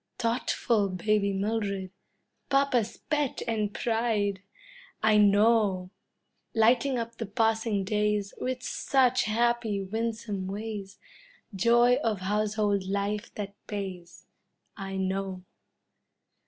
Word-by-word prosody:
Thoughtful 230 -3 +1
baby 200 +2 +1
Mildred, 200 -2 -2 0.6
papa's 275 -5 +2
pet 295 -3 0
and 215 -3 0
pride 220 -4 0 0.6
I 215 -1 +5
know! 205 -2 +4 0.6
Lighting 240 +4 +3
up 230 0 -4
the 225 - -3
passing 220 -1 +1
days 210 0 0
With 255 0 -2
such 255 -2 +2
happy, 230 -1 +1
winsome 220 -1 -3
ways, 200 -1 -5 0.6
Joy 240 +4 +4
of 215 -4 -1
household 210 0 0
life 200 +2 -2
that 200 -1 -5
pays 185 -4 -6 0.5
I 195 -1 -5
know! 190 -1 -2
210 Hz, 100 wpm, -28 LUFS, 200-230 Hz, 0.6 s, I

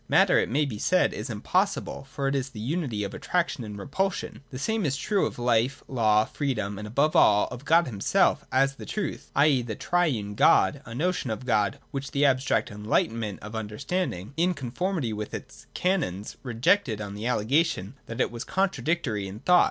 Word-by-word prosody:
Matter, - - +5
it - - 0
may 145 +5 +2
be 110 -7 -5
said, 185 +9 +2
is - - -5
impossible: 180 - -1
for 140 0 -2
it 135 - +1
is 135 -1 -1
the 115 - -10
unity 125 -3 -2
of 100 - -4
attraction 170 -7 -1
and 105 -2 -7
repulsion. 190 - -2
The 130 - -7
same 220 - -1
is 140 -4 0
true 200 +5 +1
of - - -8
life, 120 +2 +1
law, 110 -4 +3
freedom, 110 -9 -2
and 105 - -6
above 145 +9 +1
all, 105 -9 +5
of 125 +3 -8
God 170 +2 +5
himself, 105 -6 +2
as 135 +1 +3
the - - -8
true,;. 200 -8 -3 0.2
e. 140 -3 +5
the 115 -3 -5
triune 135 -14 0
God, - - +4
— - - -30
a 115 - -7
notion 170 -1 -1
of 110 +3 -4
God, 105 -5 +1
which 140 -1 -4
the 145 +1 +2
abstract 130 -3 +2
'Enlightenment' 105 0 -1
of 105 +1 -8
Understanding, 110 - -3
in 180 +2 +2
conformity 140 - -2
with 105 0 -5
its - - -10
canons, 165 - -1
rejected 120 - +1
on 100 -2 -5
the 105 +3 -4
allegation 125 - +1
that 115 +2 -6
it - - +1
was 120 -1 -5
contradictory 160 - -1
in 100 +4 -9
thought. 180 0 +5
130 Hz, 190 wpm, -27 LUFS, 110-160 Hz, 0.2 s, Matter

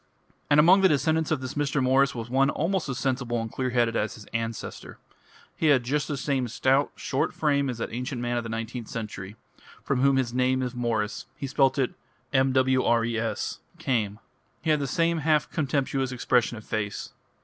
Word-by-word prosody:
And 145 0 +5
among 180 +6 +7
the 190 - +7
descendants 160 +2 +1
of 155 -4 0
this 130 0 -5
Mr. 145 -1 0
Morris 135 +1 +3
was 115 -1 -5
one 135 +2 +3
almost 165 +2 -1
as 125 - -3
sensible 125 -3 -1
and 115 0 -4
clear 130 -1 -2
headed 120 -2 +1
as 105 0 -1
his 105 - -12
ancestor. 115 -1 -5 0.6
He 160 - 0
had 135 -4 +5
just 145 +4 -1
the 145 - -2
same 135 -2 -1
stout, 130 +4 +2
short 135 - -1
frame 140 -3 +1
as 125 - -3
that 115 - -4
ancient 125 +1 -3
man 120 0 -1
of 120 - 0
the 115 - -7
nineteenth 115 +1 -4
century, 105 -3 -6 0.5
from 135 -2 0
whom 140 0 +4
his 130 -3 0
name 130 +1 +2
of 125 -1 -3
Morris 115 -4 -2
he - - -4
spelt 135 0 +2
it 130 -3 +1 0.4
Mwres 130 -4 +1 0.2
came; 120 -10 -1 0.5
he 160 - +2
had 150 - +3
the 140 - -2
same 165 +4 +1
half 150 -1 +2
contemptuous 135 -3 -1
expression 125 -2 +1
of 110 - -11
face. 105 -2 -3
130 Hz, 190 wpm, -26 LUFS, 120-140 Hz, 0.6 s, among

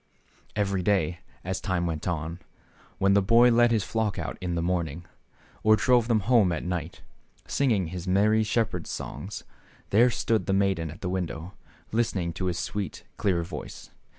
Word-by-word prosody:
Every 100 -2 0
day, 90 -3 +1 0.2
as 95 +1 -3
time 95 -4 -1
went 80 -1 -3
on, 85 0 -3 0.6
when 100 0 +3
the 100 - +5
boy 115 +5 +5
led 120 +1 +5
his 110 -4 +1
flock 110 -1 -1
out - - -4
in 90 -2 -2
tkejmorning, 85 -2 -1 0.6
or 110 0 +6
drove 120 +3 +3
them 115 -3 +2
home 110 -4 +4
at 80 - -2
night, 90 -2 -4 0.4
singing 110 - +1
his 90 +1 -6
merry 105 +4 +3
shepherd's 110 -5 -1
songs, - - -6 0.5
there 120 +5 +6
stood 115 -2 0
the 95 - +2
maiden 95 -4 +1
at 85 +6 -11
the 90 - -3
window, 90 -1 -4 0.4
listening 100 -7 0
to 95 - -4
his 90 -2 -1
sweet, 105 +1 -4
clear 90 -4 +1
voice. 85 - -8
95 Hz, 165 wpm, -27 LUFS, 85-110 Hz, 0.6 s, or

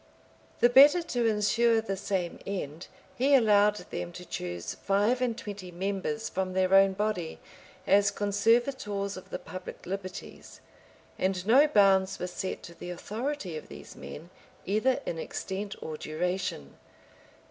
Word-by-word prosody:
The 240 - +7
better 290 +7 +7
to 245 -8 0
insure 225 +2 +3
the 220 -3 -3
same 190 -2 -3
end, 170 -4 -5 0.3
he 275 +3 +4
allowed 210 -4 +5 0.2
them 175 - -4
to 180 +1 -9
choose 90 - -5
five 205 +6 +1
and 240 -3 0
twenty 205 -6 -7
members 195 +5 -3
from 185 -1 -2
their 185 0 +2
own 195 0 +6
body, 195 -5 -2 0.5
as 200 0 +5
conservators 205 0 0
of 185 - -11
the - - -3
public 185 - -9
liberties; 185 0 -7 0.6
and 185 -1 0
no 265 +8 +6
bounds 195 -6 +4
were - - -3
set 180 +1 -5
to 170 - -10
the 170 +1 -9
authority 215 - -4
of 155 - -7
these - - -11
men 165 +4 -10 0.3
either 215 +7 +1
in 165 - -3
extent 195 +4 -5
or 155 -1 -5
duration. 175 - -3
195 Hz, 145 wpm, -29 LUFS, 185-225 Hz, 0.6 s, The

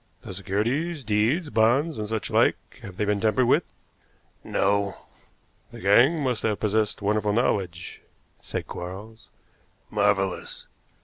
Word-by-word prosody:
"The - - -8
securities 135 - -2
deeds, 115 - +1
bonds, 120 +7 +2
and 105 - -3
such 110 0 -3
like - - +1
have 95 -2 -10
they 105 - 0
been 105 -1 0
tampered 115 +3 +2
with?" - - +3 0.8
"No." 100 0 0 0.8
"The - - -10
gang 125 - +4
must 125 -6 -1
have 105 -2 -1
possessed 105 0 0
wonderful 105 0 +1
knowledge," 95 -6 -1 0.4
said - - -5
Quarles. 100 +6 -8 0.6
"Marvelous." 100 -2 0
105 Hz, 125 wpm, -25 LUFS, 100-120 Hz, 0.8 s, gang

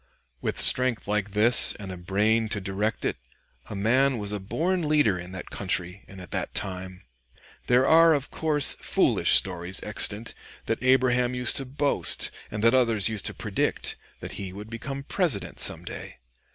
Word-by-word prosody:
With - - -3
strength 125 -4 +4
like 105 -1 -1
this 110 +4 +5
and 100 -3 -8
a - - -6
brain 105 +5 0
to 105 - -2
direct 100 +3 -3
it, - - -2 0.5
a 105 - -6
man 125 +6 +2
was 105 -2 -5
a 105 - -3
born 165 - -2
leader 145 -12 +2
in 90 +1 -9
that 95 - -9
country 95 0 -3
and 95 - -12
at 90 - -11
that - - -4
time. 95 -1 -5 0.6
There 125 +1 +3
are, 165 +2 +6
of 140 -1 -4
course, 150 -3 +2
foolish - - +2
stories 90 0 +1
extant 105 +1 0 0.3
that 115 - -2
Abraham 125 -1 +2
used 125 -1 -1
to 135 - -4
boast, 140 +2 0 0.2
and 105 0 -5
that 115 +1 +5
others 115 -5 +3
used 110 -3 -4
to - - -5
predict, - - -2 0.3
that - - -7
he 95 -2 -6
would 105 +3 -10
be 115 - -6
President 140 - -2
some - - 0
day. - - -9
110 Hz, 175 wpm, -25 LUFS, 100-130 Hz, 0.6 s, are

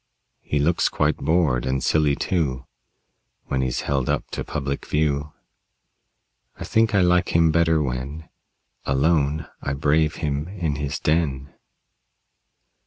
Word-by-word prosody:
He 75 - -2
looks 80 +4 +2
quite - - +1
bored, 75 -6 +1
and 65 0 -1
silly, 75 -2 +2
too, 70 -8 -1 0.8
When 65 - -1
he's 65 -1 -1
held 70 -3 -1
up - - -1
to - - -3
public 70 -3 -4
view. 75 -1 0 1.3
I - - -5
think 110 -1 +2
I 100 - +5
like 90 -1 +2
him 85 -1 +5
better 80 -1 +3
when 70 +5 -5 0.6
Alone 75 +2 +1 0.2
I 70 - -2
brave 75 +2 +1
him 75 -1 -2
in 85 -7 -3
his 70 -1 -3
den. 70 -4 0
75 Hz, 130 wpm, -23 LUFS, 70-80 Hz, 1.3 s, I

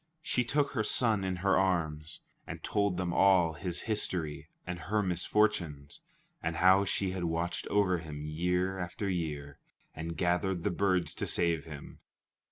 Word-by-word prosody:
She 125 - +1
took 145 +4 0
her 110 -5 0
son 110 -2 +2
in 95 -1 -1
her 95 - +4
arms, 80 -5 -1 0.3
and - - -7
told 100 -3 0
them 90 -2 -1
all 90 -4 +4
his 90 0 -3
history 90 -8 -2 0.2
and 90 0 -5
her 105 +7 0
misfortunes, 85 -5 0 0.4
and 80 +1 -2
how 95 +3 +5
she 95 0 -1
had 95 -2 -3
watched 85 +1 -2
over 95 -4 +2
him 75 -2 -7
year 90 +4 -1
after 90 +3 -4
year 75 -6 -3 0.4
and 80 +1 -5
gathered 90 0 0
the - - +1
birds 95 -1 +1
to - - -3
save 85 -3 +1
him. 75 -3 -10
90 Hz, 160 wpm, -31 LUFS, 80-95 Hz, 0.4 s, how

